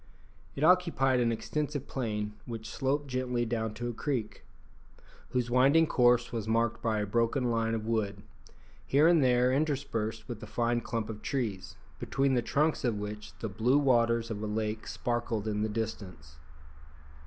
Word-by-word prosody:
It 140 - -3
occupied 160 -7 +4
an 120 -1 +2
extensive 145 +4 -3
plain 105 -5 -3
which 115 -2 -6
sloped 140 +5 -1
gently 125 -2 -1
down 110 -2 -2
to 120 +2 -4
a - - -4
creek[*], 120 -4 -3 0.9
whose 125 -2 -1
winding 135 +6 +5
course 120 -4 +3
was 115 -3 -3
marked 115 +1 +1
by 115 -2 0
a - - -1
broken 120 +4 +1
line 115 0 0
of 110 -1 -4
wood, 105 -3 -1 0.6
here 145 +4 +4
and 170 -4 +5
there 125 0 +3
interspersed 130 -7 -1
with 120 -3 -6
a 110 - -8
fine 120 +2 0
clump 115 -2 -3
of 105 -1 -7
trees, 110 -9 -3 0.2
between 135 0 +1
the 125 - +2
trunks 150 +7 +1
of 120 -5 0
which 105 +1 -7
the 110 - -2
blue 115 +7 +2
waters 115 -4 +2
of 105 -1 -4
a 110 - -2
lake 110 +1 -3
sparkled 115 -3 -2
in 105 -1 -1
the 110 - 0
distance. 95 -9 -5
115 Hz, 165 wpm, -30 LUFS, 110-130 Hz, 0.9 s, winding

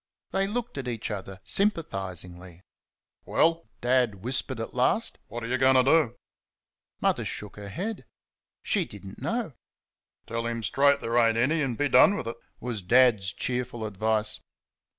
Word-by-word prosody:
They 195 0 +1
looked 240 - -3
at 130 - -5
each 115 -2 -3
other 95 -2 -6
sympathisingly. 95 - -2 0.6
"Well?" 165 0 +2
Dad 120 -6 +1
whispered 130 0 -1
at 115 - -5
last; 130 - +1
"what 120 0 -6
are - - -3
you 130 +1 0
going 130 0 +5
to 130 - +6
do?" 135 -3 +3 0.8
Mother - - +1
shook 105 -2 -5
her 100 -1 -8
head. 185 - -4 0.6
She - - +1
did 100 -1 -11
n't 95 - -10
know. 230 - -2 0.7
"Tell 115 0 -3
him 115 -1 -3
straight 140 +4 +3
there 115 +1 +1
ain't 115 -1 +3
any, 150 +7 +2
an' 130 -4 -1
be 145 +5 +1
done 140 +10 +6
with 115 - -5
it," 115 - -5 0.2
was 120 -4 -4
Dad's 110 -2 +4
cheerful 125 -2 -3
advice. 110 +1 0
120 Hz, 160 wpm, -27 LUFS, 105-140 Hz, 0.8 s, to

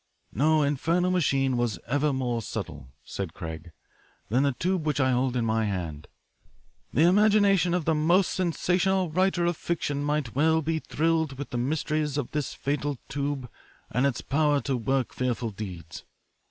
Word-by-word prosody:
"No 155 +2 +3
infernal 165 +6 +1
machine 135 -7 +1
was 120 -3 0
ever 145 +4 +1
more 125 -3 -1
subtle," 85 - -6
said 95 -5 -5
Craig, 80 0 -7 0.6
"than 125 +5 +2
the 140 -1 +2
tube 180 +5 -1
which 150 -2 0
I 130 -1 +3
hold 125 0 +1
in 120 -2 0
my 110 0 +1
hand. 85 -7 -4 0.8
The 150 - +3
imagination 200 -2 +4
of 175 -4 -1
the 160 - +3
most 170 +5 +3
sensational 185 0 +1
writer 185 0 +2
of 175 0 +1
fiction 145 -4 -2
might 145 -5 -1
well 160 +3 +3
be 160 +1 0
thrilled 160 -3 0
with 145 - -6
the 120 - -2
mysteries 150 +2 -1
of 140 -5 -3
this 150 -2 -3
fatal 145 0 -2
tube 140 -2 -3 0.4
and 125 +4 +2
its 135 - -2
power 145 0 +2
to 135 +2 -1
work 130 +2 -1
fearful 120 -2 -2
deeds. 90 -6 -8
145 Hz, 165 wpm, -27 LUFS, 120-160 Hz, 0.8 s, imagination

